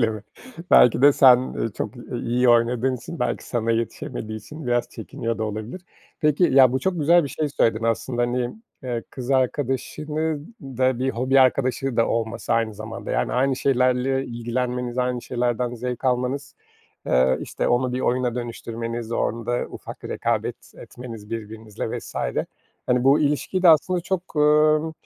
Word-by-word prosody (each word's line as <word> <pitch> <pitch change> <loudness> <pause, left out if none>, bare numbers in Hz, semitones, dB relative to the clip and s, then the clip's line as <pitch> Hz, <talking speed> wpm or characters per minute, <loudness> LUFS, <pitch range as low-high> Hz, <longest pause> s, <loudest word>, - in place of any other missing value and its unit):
Öyle 115 -2 +3
mi? 110 -1 -6 0.5
Belki 125 +1 +6
de 145 0 +8
sen, 130 -3 +7
ııı, 115 -4 -3
çok, 110 +4 -5
i - - -10 0.2
iyi 125 +1 +2
oynadığın 120 +2 +3
için, 155 +8 -9
belki 120 -1 -1
sana 115 -2 -1
yetişemediği 110 -1 -3
için 150 +7 -10
biraz 120 0 +1
çekiniyor 115 +1 -5
da 110 - -1
olabilir. 110 - -6 0.4
Peki, 150 +3 +3
ya, 130 -5 +6
bu 130 - +1
çok 180 +1 -1
güzel 170 +2 +4
bir - - -4
şey 150 +2 -2
söyledin 115 -4 +1
aslında 115 +2 0
hani. 120 0 -1 0.3
Eee, 120 -2 -3
kız 130 0 -6
arkadaşının 150 - -1
da 130 -2 0
bir 130 +1 0
hobi 130 +3 +2
arkadaşı 130 0 +1
da 115 - +3
olması 115 0 -2
aynı 115 -2 0
zamanda. 110 +2 -7
Yani, - - 0
aynı 130 +1 +1
şeylerle 130 0 +1
ilgilenmeniz, 125 +1 -3
aynı 125 -1 -1
şeylerden 120 0 -1
zevk 125 +2 -5
almanız, 130 +2 -1 0.5
eee, 65 +1 +3
işte, - - -2
onu 125 +1 +1
bir 125 - -2
oyuna 125 -1 0
dönüştürmeniz, 115 -1 -5
orada 115 +1 -1
ufak - - -10
bir - - -7
rekabet - - -1 0.2
etmeniz 115 -4 -10
birbirinizle 110 -1 -5
vs. - - -11 0.7
Hani, 125 0 +2
bu 135 +2 +5
ilişkiyi 150 +5 0
de 175 - +7
aslında 175 +3 +4
çok, 180 -2 -4
ııı, 150 +1 +4
125 Hz, 165 wpm, -23 LUFS, 115-135 Hz, 0.7 s, de